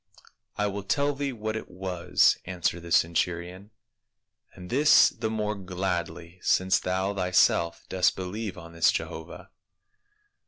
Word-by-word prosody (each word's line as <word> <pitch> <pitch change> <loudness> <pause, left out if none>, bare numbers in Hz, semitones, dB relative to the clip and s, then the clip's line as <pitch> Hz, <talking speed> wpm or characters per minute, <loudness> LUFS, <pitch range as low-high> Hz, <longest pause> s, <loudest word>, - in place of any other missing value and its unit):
" - - -49
I 105 - +1
will 100 0 -3
tell 140 +9 0
thee 140 0 -3
what 110 -2 -4
it 110 - -6
was," 90 -1 +2
answered 90 -1 -2
the 85 - -10
centu 85 +1 +2
rion, 90 +4 -10 0.4
" - - -43
and 90 -1 -11
this 145 +4 +6
the 110 - -4
more 105 -1 -1
gladly 90 -2 -4
since 95 0 +2
thou 95 +2 -1
thyself 90 -3 +2
dost 95 -1 +2
believe 95 +2 -5
on 85 -1 -11
this 85 -1 +3
Jehovah." 80 +1 -6
95 Hz, 150 wpm, -27 LUFS, 85-105 Hz, 0.4 s, this